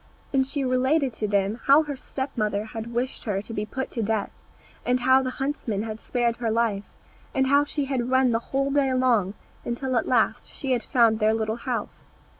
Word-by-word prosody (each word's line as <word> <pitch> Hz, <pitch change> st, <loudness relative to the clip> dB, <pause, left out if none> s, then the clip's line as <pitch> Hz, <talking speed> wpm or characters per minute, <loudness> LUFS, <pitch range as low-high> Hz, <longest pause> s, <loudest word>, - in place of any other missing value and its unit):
And 265 Hz, -1 st, +2 dB
she 280 Hz, 0 st, -2 dB
related 260 Hz, +2 st, +2 dB
to 215 Hz, -1 st, -2 dB
them 200 Hz, +2 st, 0 dB
how 285 Hz, +3 st, +6 dB
her 290 Hz, -2 st, -5 dB
step 270 Hz, +1 st, -5 dB
mother 210 Hz, -2 st, -1 dB
had 225 Hz, +1 st, -7 dB
wished 245 Hz, +3 st, -3 dB
her 205 Hz, -3 st, 0 dB
to 225 Hz, -, -8 dB
be 210 Hz, -1 st, -3 dB
put 265 Hz, +2 st, -4 dB
to 235 Hz, -, -3 dB
death, 220 Hz, -1 st, -1 dB, 0.5 s
and 250 Hz, 0 st, +1 dB
how 260 Hz, +1 st, +5 dB
the 260 Hz, -, -2 dB
huntsman 255 Hz, -6 st, -2 dB
had 220 Hz, -1 st, -5 dB
spared 240 Hz, -1 st, -1 dB
her 235 Hz, -2 st, -1 dB
life, 220 Hz, -3 st, 0 dB, 0.5 s
and 265 Hz, -, +3 dB
how 280 Hz, +2 st, +4 dB
she 290 Hz, -1 st, -2 dB
had 255 Hz, -3 st, -2 dB
run 260 Hz, -1 st, +4 dB
the 230 Hz, -, +2 dB
whole 275 Hz, +1 st, 0 dB
day 275 Hz, -1 st, +2 dB
long, 230 Hz, -7 st, +2 dB, 0.3 s
until 255 Hz, +2 st, -2 dB
at 230 Hz, -, +1 dB
last 230 Hz, -1 st, +1 dB
she 270 Hz, -, -4 dB
had 245 Hz, -2 st, +2 dB
found 230 Hz, -1 st, +3 dB
their 215 Hz, 0 st, +3 dB
little 220 Hz, 0 st, -1 dB
house. 240 Hz, -3 st, -5 dB
245 Hz, 210 wpm, -25 LUFS, 220-265 Hz, 0.5 s, how